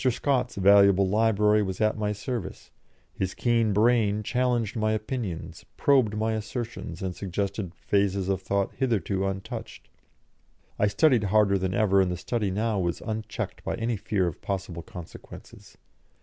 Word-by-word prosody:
Scott's 125 Hz, 0 st, 0 dB
valuable 100 Hz, 0 st, +5 dB
library 105 Hz, 0 st, +3 dB
was 95 Hz, -2 st, -3 dB
at 110 Hz, 0 st, +2 dB
my 105 Hz, -1 st, -1 dB
service; 105 Hz, +1 st, -5 dB, 0.4 s
his 95 Hz, -1 st, -3 dB
keen 115 Hz, -3 st, +2 dB
brain 105 Hz, 0 st, +2 dB
challenged 120 Hz, -2 st, 0 dB
my 110 Hz, -1 st, +1 dB
opinions, 110 Hz, -5 st, -4 dB
probed 125 Hz, -7 st, +3 dB
my 110 Hz, +1 st, 0 dB
assertions, 110 Hz, -5 st, -5 dB
and 90 Hz, -2 st, -3 dB
suggested 100 Hz, -1 st, -3 dB
phases 100 Hz, -2 st, 0 dB
of 95 Hz, -1 st, 0 dB
thought 100 Hz, +1 st, -1 dB
hitherto 100 Hz, -6 st, 0 dB
untouched. 95 Hz, 0 st, -6 dB, 0.9 s
I 105 Hz, -, +4 dB
studied 115 Hz, +2 st, +3 dB
harder 100 Hz, -1 st, +3 dB
than 95 Hz, 0 st, -1 dB
ever, 100 Hz, -2 st, +4 dB
and 95 Hz, -, +1 dB
the 90 Hz, -, -3 dB
study 105 Hz, +2 st, -2 dB
now 105 Hz, +2 st, 0 dB
was 85 Hz, -2 st, -2 dB
unchecked 110 Hz, -1 st, -5 dB
by -, -, -2 dB
any 115 Hz, +1 st, -1 dB
fear 100 Hz, -1 st, -1 dB
of 85 Hz, -4 st, -4 dB
possible 95 Hz, -4 st, -4 dB
consequences. 85 Hz, 0 st, -12 dB
105 Hz, 150 wpm, -26 LUFS, 95-110 Hz, 0.9 s, valuable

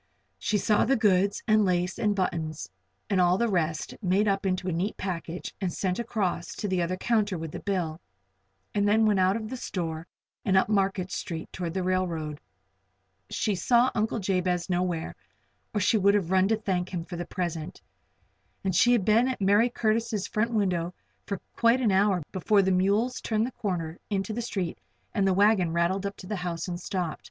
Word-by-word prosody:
She 215 Hz, -, +1 dB
saw 210 Hz, +1 st, +3 dB
the 270 Hz, +4 st, +3 dB
goods, 200 Hz, -3 st, +2 dB
and 215 Hz, -1 st, +5 dB
lace, 180 Hz, -1 st, 0 dB
and 210 Hz, -2 st, +1 dB
buttons, 165 Hz, -5 st, -2 dB, 0.4 s
and 195 Hz, -4 st, +2 dB
all 180 Hz, +1 st, +4 dB
the 235 Hz, -, +2 dB
rest, 165 Hz, -6 st, -1 dB
made 195 Hz, +2 st, +2 dB
up 195 Hz, 0 st, +1 dB
into 185 Hz, 0 st, -1 dB
a -, -, 0 dB
neat 180 Hz, +6 st, -2 dB
package 175 Hz, -2 st, -4 dB
and 185 Hz, -2 st, 0 dB
sent 185 Hz, +2 st, -2 dB
across 200 Hz, -7 st, -2 dB
to 210 Hz, -, -3 dB
the 185 Hz, -2 st, 0 dB
other 175 Hz, +2 st, -1 dB
counter 210 Hz, -3 st, +1 dB
with 160 Hz, -1 st, -5 dB
the -, -, -6 dB
bill, 175 Hz, -5 st, -2 dB, 0.7 s
and 205 Hz, 0 st, +2 dB
then 220 Hz, +2 st, +4 dB
went 210 Hz, -3 st, +3 dB
out 185 Hz, +1 st, +3 dB
of 220 Hz, -1 st, -4 dB
the 260 Hz, -, -5 dB
store 165 Hz, -7 st, -4 dB, 0.4 s
and 190 Hz, -2 st, +3 dB
up 190 Hz, -, +4 dB
Market 195 Hz, -3 st, +1 dB
Street 165 Hz, -2 st, -5 dB
toward 175 Hz, -2 st, -4 dB
the 190 Hz, -, 0 dB
railroad. 170 Hz, -5 st, -1 dB, 0.9 s
She 215 Hz, -, 0 dB
saw 240 Hz, +7 st, +3 dB
Uncle 220 Hz, +1 st, 0 dB
Jabez 185 Hz, -2 st, 0 dB
nowhere, 175 Hz, -2 st, -1 dB, 0.6 s
or 210 Hz, -, -1 dB
she 210 Hz, +3 st, +3 dB
would 200 Hz, +1 st, +4 dB
have 190 Hz, -4 st, 0 dB
run 190 Hz, 0 st, +4 dB
to 220 Hz, -, +3 dB
him 215 Hz, -, -10 dB
to -, -, -38 dB
thank 180 Hz, -2 st, 0 dB
him 170 Hz, -3 st, -3 dB
for 175 Hz, -, -7 dB
the 175 Hz, 0 st, -5 dB
present. 170 Hz, -4 st, -4 dB, 0.8 s
And 190 Hz, -2 st, 0 dB
she 240 Hz, +7 st, +5 dB
had 220 Hz, -6 st, +2 dB
been 225 Hz, +4 st, +4 dB
in 260 Hz, -, 0 dB
Mercy 205 Hz, +4 st, +4 dB
Curtis' 220 Hz, -3 st, 0 dB
front 215 Hz, +2 st, 0 dB
window 185 Hz, -6 st, 0 dB, 0.3 s
for 200 Hz, -2 st, -3 dB, 0.2 s
quite 235 Hz, +2 st, +4 dB
an 235 Hz, -5 st, +2 dB
hour 190 Hz, -2 st, +3 dB
before 200 Hz, +2 st, +3 dB
the 190 Hz, -, +2 dB
mules 200 Hz, +7 st, +1 dB
turned 220 Hz, 0 st, 0 dB
the 255 Hz, -, -4 dB
corner 175 Hz, -7 st, -3 dB
into 200 Hz, +1 st, -1 dB
the 240 Hz, -, -2 dB
street 190 Hz, -7 st, -3 dB, 0.3 s
and 195 Hz, -2 st, +2 dB
the 190 Hz, -, +3 dB
wagon 200 Hz, -4 st, +3 dB
rattled 185 Hz, +4 st, +1 dB
up 200 Hz, -, -7 dB
to -, -, -10 dB
the 210 Hz, 0 st, -3 dB
house 175 Hz, -2 st, -3 dB
and 175 Hz, -1 st, -4 dB
stopped. 180 Hz, -3 st, -3 dB
190 Hz, 200 wpm, -27 LUFS, 180-210 Hz, 0.9 s, and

